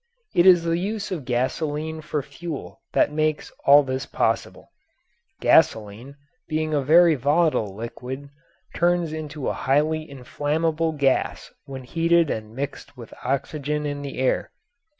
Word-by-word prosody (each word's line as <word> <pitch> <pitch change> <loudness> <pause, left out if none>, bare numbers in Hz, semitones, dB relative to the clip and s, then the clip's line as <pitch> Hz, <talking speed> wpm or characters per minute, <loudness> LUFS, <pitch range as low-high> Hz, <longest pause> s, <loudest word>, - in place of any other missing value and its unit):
It 175 +2 +4
is 175 -2 +7
the 165 0 0
use 210 +2 -3
of 160 -8 -4
gasoline 150 +5 -2
for 150 -2 -3
fuel 155 +2 -8
that - - +3
makes 155 0 -1 0.2
all 145 +1 +8
this 130 0 -4
possible. - - -2 0.7
Gasoline, 110 +6 +2 0.3
being 155 0 -1
a 145 - +2
very 165 +4 +6
volatile 145 - +1
liquid, 125 +5 -7 0.4
turns 175 -2 +1
into 150 -2 -5
a - - 0
highly 155 +3 0
inflammable 155 +5 -1
gas 140 -3 0
when 135 -1 -8
heated 165 +3 +2
and 110 0 -5
mixed 140 0 -6
with 120 -2 -11
the - - -15
oxygen 150 +2 -2
in 145 -1 -3
the 140 -1 -6
air. 130 0 0
150 Hz, 140 wpm, -24 LUFS, 135-160 Hz, 0.7 s, all